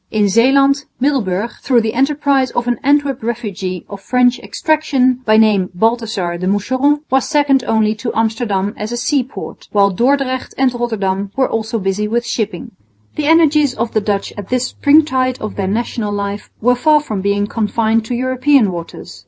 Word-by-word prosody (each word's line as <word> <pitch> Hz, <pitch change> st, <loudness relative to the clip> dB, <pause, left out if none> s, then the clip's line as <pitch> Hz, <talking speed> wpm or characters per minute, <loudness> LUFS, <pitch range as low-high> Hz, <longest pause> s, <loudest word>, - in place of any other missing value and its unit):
In 210 Hz, -2 st, +1 dB
Zeeland, 275 Hz, +6 st, +3 dB
Middelburg, 235 Hz, -6 st, -1 dB
through 245 Hz, -3 st, +2 dB
the 220 Hz, 0 st, -2 dB
enterprise 275 Hz, 0 st, +1 dB
of 240 Hz, -, -2 dB
an 245 Hz, -2 st, -1 dB
Antwerp 285 Hz, -2 st, +1 dB
refugee 200 Hz, -6 st, -4 dB
of 200 Hz, -1 st, -9 dB
French 250 Hz, +2 st, +2 dB
extraction, 280 Hz, -6 st, 0 dB
by 215 Hz, 0 st, +4 dB
name 210 Hz, -4 st, +3 dB
Balthazar 220 Hz, -4 st, -1 dB
de 185 Hz, -, -2 dB
Moucheron, 260 Hz, +9 st, +1 dB
was 265 Hz, 0 st, +2 dB
second 290 Hz, -4 st, +2 dB
only 220 Hz, -1 st, +2 dB
to 230 Hz, +2 st, -4 dB
Amsterdam 220 Hz, -3 st, -1 dB
as 210 Hz, +2 st, -5 dB
a 240 Hz, -, -3 dB
sea 265 Hz, +3 st, +1 dB
port, 260 Hz, -, -10 dB
while 200 Hz, -1 st, +3 dB
Dordrecht 260 Hz, +4 st, 0 dB
and 260 Hz, -1 st, +2 dB
Rotterdam 200 Hz, -5 st, -2 dB
were 265 Hz, -1 st, +2 dB
also 225 Hz, +1 st, -2 dB
busy 195 Hz, +1 st, -1 dB
with 235 Hz, +2 st, -1 dB
shipping. 235 Hz, +1 st, -3 dB, 0.4 s
The 295 Hz, -, -2 dB
energies 300 Hz, -4 st, +4 dB
of 230 Hz, +1 st, -2 dB
the 215 Hz, -, 0 dB
Dutch 205 Hz, -1 st, -2 dB
at 200 Hz, -, -8 dB
this 255 Hz, 0 st, 0 dB
springtide 265 Hz, -4 st, +2 dB
of 215 Hz, -, -6 dB
their 195 Hz, -2 st, -2 dB
national 220 Hz, +1 st, -2 dB
life 200 Hz, 0 st, -4 dB
were 245 Hz, +3 st, +4 dB
far 300 Hz, +5 st, +3 dB
from 215 Hz, -9 st, -4 dB
being 200 Hz, +1 st, 0 dB
confined 220 Hz, +1 st, 0 dB
to 245 Hz, -, -3 dB
European, 255 Hz, -2 st, +2 dB
waters. 170 Hz, -1 st, -8 dB
235 Hz, 175 wpm, -16 LUFS, 205-265 Hz, 0.4 s, by